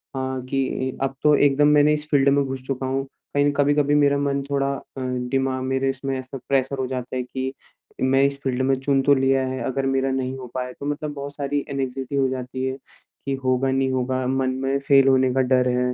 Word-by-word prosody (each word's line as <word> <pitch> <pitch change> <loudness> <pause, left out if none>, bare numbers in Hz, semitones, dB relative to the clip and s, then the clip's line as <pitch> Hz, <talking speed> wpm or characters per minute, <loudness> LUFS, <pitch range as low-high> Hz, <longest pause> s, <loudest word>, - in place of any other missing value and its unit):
हाँ, 130 -1 -2
कि 130 -1 -1
अ, - - +1
अब 135 - -4
तो 150 -1 +6
एकदम 145 +1 +4
मैंने 150 +1 +5
इस 150 0 -4
फ़ील्ड 140 -2 +4
में 140 0 +3
घुस 130 -1 -5
चुका 135 -1 -2
हूँ, 135 +1 -1 0.3
कहीं 145 0 +3
कभी-कभी 145 0 +2
मेरा 140 -1 +4
मन 140 -1 0
थोड़ा 140 -1 0
अ, - - -8 0.2
दिमाग 130 +1 -1
मेरे 135 +1 0
इसमें 135 0 -3
ऐसा 130 +1 -7
प्रेशर 135 0 +1
हो 130 - -1
जाता 130 0 -5
है 125 - -1
कि 130 +1 -4 0.5
मैं 135 +1 +3
इस 140 0 0
फ़ील्ड 130 -1 -1
में 135 +1 +2
चुन 135 0 +2
तो 140 +1 +4
लिया 135 0 +2
है, 130 0 -4
अगर 135 +1 -1
मेरा 135 0 +1
नहीं 130 0 -2
हो 130 -1 -8
पाए 125 0 -3
तो 140 - -6
मतलब 145 0 -3
बहुत 140 0 -7
सारी 145 0 -1
एंग्ज़ायटी 135 0 -3
हो 135 -1 +3
जाती 130 0 -4
है, 130 0 -2 0.5
कि 140 - -1
होगा 130 +1 +1
नहीं 130 0 +1
होगा, 130 0 -1
मन 130 0 +1
में 135 +1 +1
फेल 135 -1 +4
होने 130 -1 +4
का 130 - +2
डर 125 0 +2
है। 125 0 0
135 Hz, 225 wpm, -23 LUFS, 130-140 Hz, 0.5 s, तो